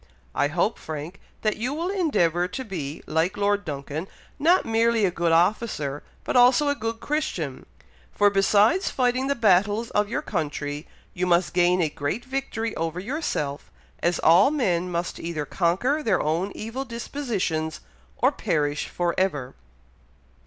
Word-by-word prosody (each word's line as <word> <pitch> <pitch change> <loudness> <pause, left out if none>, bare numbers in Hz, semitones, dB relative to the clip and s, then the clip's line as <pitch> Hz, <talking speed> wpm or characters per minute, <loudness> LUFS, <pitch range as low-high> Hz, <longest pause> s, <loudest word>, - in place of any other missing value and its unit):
I 145 - +2
hope, 170 +8 0
Frank, 155 +4 -7 0.2
that 215 -1 +1
you 250 +6 -2
will 335 +3 -2
endeavour 180 - +1
to 260 +8 -6
be, 160 - -5
like 165 +6 0
Lord 205 0 +1
Duncan, 150 +2 -5 0.3
not 345 +5 +4
merely 225 -1 +2
a 185 - +1
good 170 -1 0
officer, 165 -5 +1 0.2
but - - -3
also 250 +4 +5
a - - +3
good 225 -2 -4
Christian; 210 - -3 0.4
for, 205 0 +3
besides 205 - +3
fighting 255 +1 +1
the 280 - +1
battles 210 +1 +2
of 210 0 +1
your - - -2
country, 150 -3 -3 0.3
you 180 +1 -1
must 175 0 +2
gain 180 0 +3
a - - +2
great 150 - -3
victory 255 -4 -3
over 165 +1 -2
yourself, 185 - -3 0.3
as 170 0 +1
all 175 - +6
men 185 - 0
must 170 0 -3
either 165 -3 -3
conquer 195 - +1
their 215 -10 +2
own 170 +6 0
evil 230 +5 -4
dispositions, 230 - -3 0.4
or - - +3
perish 145 -2 -1
for 175 -1 -1
ever." 145 -9 -1
190 Hz, 150 wpm, -25 LUFS, 165-235 Hz, 0.4 s, all